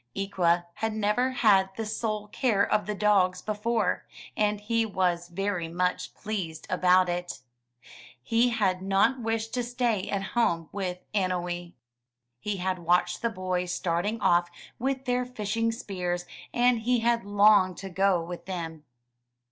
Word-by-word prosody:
Ikwa 175 -3 +1
had 220 +2 -2
never 215 +4 +1
had 205 -7 +4
the 225 - -2
sole 215 -1 -3
care 210 -3 +2
of 210 0 0
the 210 - -2
dogs 195 -3 +3
before, 215 +3 -1 0.3
and 210 -1 +1
he 230 +2 0
was 180 -5 0
very 180 -1 -2
much 180 +2 -2
pleased 180 -7 -4
about 185 0 +4
it. 175 -5 -4 0.8
He 230 - +3
had 195 -6 0
not 195 +7 +2
wished 225 0 -2
to 245 - 0
stay 240 -5 -1
at 200 -1 -1
home 170 -9 +1
with 185 -3 -3 0.2
Annowee. 175 -3 -2 0.7
He 210 +5 -3
had 185 0 -1
watched 175 +1 +1
the 235 - +1
boys 185 -3 -2
starting 180 +6 -1
off 175 -2 +3 0.3
with 270 +1 -1
their 250 0 +1
fishing 230 -2 -1
spears, 180 -6 -3 0.3
and 245 -1 +3
he 240 +1 +1
had 235 0 +2
longed 205 -2 +4
to 195 - -7
go 190 -2 +2
with 175 +1 -8
them. 165 -4 -5
195 Hz, 150 wpm, -27 LUFS, 180-225 Hz, 0.8 s, had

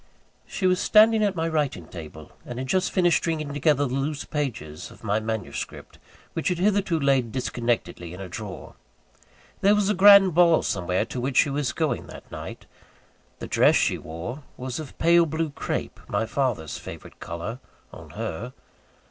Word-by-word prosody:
She 190 - -3
was 185 0 +3
standing 220 0 +5
at 200 -2 +1
my 165 -1 -1
writing 145 - -1
table, 80 -2 -10
and 120 - -7
had 130 +1 -4
just 185 +5 +1
finished 175 -3 +3
stringing 155 -3 -2
together 145 0 +2
the 125 - -3
loose 140 +2 -2
pages 110 - -4
of - - -16
my 105 0 +1
manuscript, 110 -3 -5 0.3
which 165 - -2
had 180 - +1
hitherto 190 -3 +1
laid 135 -5 +2
disconnectedly 120 -8 -2
in 90 - -9
a 95 - -6
drawer. 95 +1 -8 0.9
There 200 +2 +4
was 210 -1 +1
a - - +2
grand 200 -1 +8
ball 170 -1 +5
somewhere, 90 +3 0
to 120 +3 -5
which 130 +1 -2
she 145 - +4
was 140 -3 -1
going - - -2
that - - -12
night. - - -8 0.7
The - - -6
dress - - +4
she - - +2
wore 85 - -7 0.2
was 130 +3 -4
of 155 -3 -9
pale 170 0 +5
blue 160 0 -2
crape - - -4
(my 105 +2 0
father's 115 - -2
favourite - - -10
colour, 85 +9 -5 0.3
on - - -11
her). 120 +10 -4
140 Hz, 175 wpm, -25 LUFS, 110-170 Hz, 0.9 s, grand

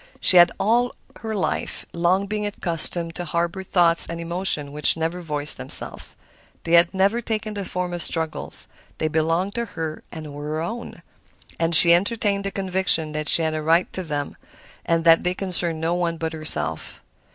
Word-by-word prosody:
She 185 - +6
had 175 0 +7
all 240 +3 +1 0.2
her 220 -1 -4
life 195 - -3
long 175 +3 +1
been 210 +1 -3
accustomed 170 -4 0
to 175 - -5
harbor 170 +2 -2
thoughts 175 -3 +4
and 170 0 -6
emotions 170 -4 -1
which 150 +2 +3
never 165 +2 -2
voiced 150 -3 -3
themselves. - - -2 0.5
They 165 - -5
had 170 0 +5
never 200 +5 +1
taken 215 -2 -3
the 200 -2 -5
form 180 0 -3
of 175 - -4
struggles. 160 -1 -2 0.3
They 155 - -1
belonged 165 +5 0
to 235 0 -2
her 160 -7 -6
and 155 -3 -8
were 145 +1 -7
her 155 +1 -3
own, 230 +8 -6 0.6
and 165 0 +2
she 170 +1 +8
entertained 200 +1 +1
the - - 0
conviction 185 -5 0
that 155 0 -2
she 165 - +5
had 160 0 0
a 155 - -3
right 165 +3 +2
to 185 - -4
them 145 -4 -4 0.5
and 165 -1 +1
that 165 0 +5
they 180 0 -1
concerned 175 -4 0
no 165 +2 0
one 170 -1 -1
but 160 0 -4
herself. 80 - -4
170 Hz, 185 wpm, -23 LUFS, 160-190 Hz, 0.6 s, she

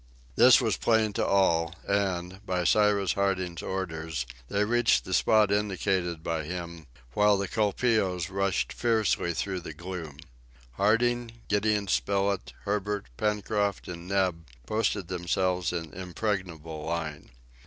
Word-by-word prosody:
This - - +8
was - - 0
plain 110 -2 +2
to - - 0
all, 85 -4 +2
and, 95 -1 -1
by 90 -3 -1
Cyrus 100 -1 +3
Harding's 95 -3 -1
orders, 80 -7 -3 0.2
they 100 +1 +1
reached 120 +1 +3
the 95 - -4
spot 105 +1 +4
indicated 95 -4 0
by 80 -1 -2
him, 85 -1 -6 0.3
while 105 +3 +4
the 100 0 -2
colpeos 105 -4 +1
rushed 100 -1 0
fiercely 110 -7 +1
through 95 +1 -2
the 80 -3 -8
gloom. 85 -3 -7 0.5
Harding, 115 - +1
Gideon 105 0 +1
Spilett, 100 -1 0
Herbert, 105 -4 -2
Pencroft 105 - -1
and 85 0 -7
Neb 90 -4 0 0.2
posted 105 -2 0
themselves 90 0 0
in 80 -3 -5
impregnable 90 -4 -4
line. 80 -2 -4
95 Hz, 125 wpm, -28 LUFS, 85-105 Hz, 0.5 s, This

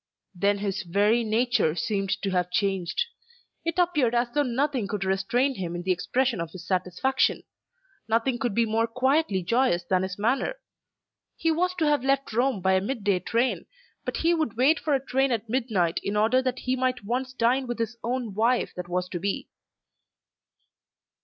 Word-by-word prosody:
Then 200 +2 +1
his 200 0 -2
very 205 +6 +2
nature 220 -7 +1
seemed 195 +1 -1
to 195 - 0
have 180 -1 0
changed. 195 - 0 0.6
It 335 +1 -2
appeared 300 -10 +2
as 240 0 +1
though 295 - +3
nothing 265 -3 0
could 205 -2 -3
restrain 195 +8 +1
him 175 -6 -4
in 175 - -4
the 185 - 0
expression 240 +3 0
of 165 - -4
his 180 +1 -10
satisfaction. 185 +8 0 0.6
Nothing 235 +3 +1
could 240 -6 -1
be 235 - +3
more 225 +1 +1
quietly 255 - +1
joyous 230 -2 +2
than 185 +1 +1
his 190 0 -4
manner. 240 - 0 0.8
He 330 - +1
was 360 +3 0
to 330 -3 0
have 295 -3 +2
left 275 -2 0
Rome 245 -3 +1
by 190 +1 +3
a 190 - +3
mid 230 +2 -3
day 195 -2 +2
train, 235 +7 -1 0.4
but - - -3
he 335 +1 +2
would 315 -10 -1
wait 280 +6 +4
for 300 -3 +1
a 270 0 -3
train 270 +1 +1
at 230 -1 -1
midnight 215 -9 0
in 205 +1 -2
order 225 +5 +3
that 255 -1 -2
he 255 0 -1
might 255 -2 -1
once 255 +4 -2
dine 255 +1 +1
with 240 - -3
his 230 0 -2
own 240 -3 -2
wife 230 +4 +1
that 180 -1 -6
was 180 +1 -1
to 175 - -4
be. 200 +3 -3
230 Hz, 185 wpm, -26 LUFS, 195-260 Hz, 0.8 s, wait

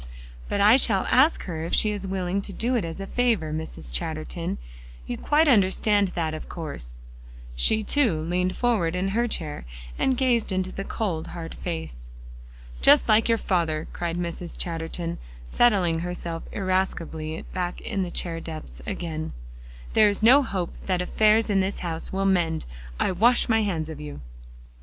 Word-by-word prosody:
"But - - 0
I 215 +5 +7
shall 210 -7 +3
ask 265 +7 +4
her 160 -4 -4
if 165 - 0
she 215 - +3
is 200 -2 -4
willing 190 0 -1
to 200 - -6
do 240 +6 -1
it 230 - +1
as 165 +2 -5
a 195 - -4
favor, 215 -9 0
Mrs. 155 - -5
Chatterton; - - -3 0.5
you - - -3
quite 305 - +2
understand 205 -3 +3
that, 160 -2 -1
of 155 - -7
course?" 140 - -5 0.6
She, 215 - +3
too, 225 - +2
leaned 180 +3 -1
forward 205 -9 +1
in 185 +2 0
her 235 +4 +1
chair, 155 -9 -3 0.4
and 260 -1 +2
gazed 245 -5 +2
into 185 0 -1
the 195 - -5
cold, 185 -7 -3
hard 165 -2 -7
face. - - -6 0.7
"Just - - +6
like 220 +2 +4
your 230 - +4
father," 165 -6 0
cried 170 -1 -3
Mrs. 175 0 -4
Chatterton, 165 0 -3 0.3
settling 185 - +3
herself 170 -1 -4
irascibly 175 -5 -2
back 180 -1 -2
in 200 -4 -2
the 180 - -2
chair 170 -1 -2
depths 155 - -8
again. 160 -2 -4 0.6
"There 215 -1 +6
is 205 +1 -3
no 260 +6 +8
hope 190 -9 -3
that 180 -2 +1
affairs 215 +4 +3
in 200 -2 +2
this 190 +1 -1
house 165 -1 -4
will 195 +1 -1
mend. 175 -4 +1 0.3
I - - +2
wash 235 +7 +3
my 225 -1 +3
hands 170 -7 -1
of 155 -2 -7
you." 150 -1 -7
180 Hz, 170 wpm, -25 LUFS, 165-210 Hz, 0.7 s, no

